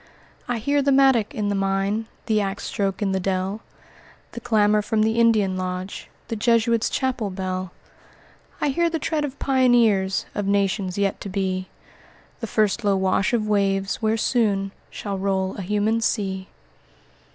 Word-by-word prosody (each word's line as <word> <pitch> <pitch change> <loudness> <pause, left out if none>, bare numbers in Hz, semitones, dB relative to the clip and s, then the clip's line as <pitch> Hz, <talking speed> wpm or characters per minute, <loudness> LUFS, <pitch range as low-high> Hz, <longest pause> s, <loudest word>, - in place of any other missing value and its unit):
"I 245 - -1
hear 285 +6 +1
the 280 0 +2
mattock 265 -5 +4
in 210 -2 -1
the - - 0
mine, 195 +3 0 0.2
The 215 -1 +2
ax 195 0 -3
stroke 195 0 -2
in 195 - 0
the 190 - 0
dell, 190 +3 -2 0.7
The - - -7
clamor 210 -2 +3
from 215 0 0
the 220 +1 +1
Indian 215 -5 +3
lodge, 185 +1 -5 0.2
The 230 - -3
Jesuits' 230 0 +2
chapel 255 -6 -1
bell! 185 -1 -4 0.9
"I 295 - +1
hear 340 +5 +1
the 330 - -1
tread 315 -1 -1
of 280 -1 -4
pioneers 240 -8 +3
Of 205 -1 -2
nations 195 -1 0
yet 200 -1 0
to 200 - -5
be; 185 -1 -2 0.7
The 230 - -4
first 215 +1 +1
low 200 -1 +3
wash 190 +1 +1
of 225 -3 0
waves, 195 -2 +1
where 220 0 +1
soon 205 -5 +1 0.2
Shall 200 -2 -5
roll 190 -1 -1
a - - -4
human 210 +4 0
sea." 190 -4 -1
205 Hz, 165 wpm, -23 LUFS, 195-230 Hz, 0.9 s, mattock